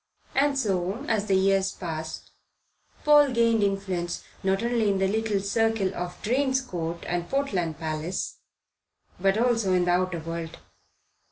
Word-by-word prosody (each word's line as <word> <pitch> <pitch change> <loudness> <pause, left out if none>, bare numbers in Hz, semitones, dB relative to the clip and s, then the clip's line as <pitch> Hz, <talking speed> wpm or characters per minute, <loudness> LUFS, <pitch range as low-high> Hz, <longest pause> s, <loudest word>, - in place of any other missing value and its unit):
And 280 0 +2
so, 195 +1 -1
as 215 -2 0
the 195 - +3
years 195 0 +3
passed, 160 -3 -6 0.7
Paul 295 -1 +6
gained 230 -2 +3
influence 195 -3 -1 0.2
not 195 +2 +1
only 235 -3 +1
in 195 - +1
the 190 0 +2
little 215 0 0
circle 205 -1 +1
of 180 0 -5
Drane's 260 +3 +2
Court 170 -9 -5
and 175 0 -2
Portland 190 - -1
Place, 160 +3 -3 0.8
but 195 +2 +2
also 230 -5 +2
in 180 -1 +3
the 175 - +2
outer 180 0 +1
world. 165 0 -5
195 Hz, 145 wpm, -26 LUFS, 175-225 Hz, 0.8 s, Paul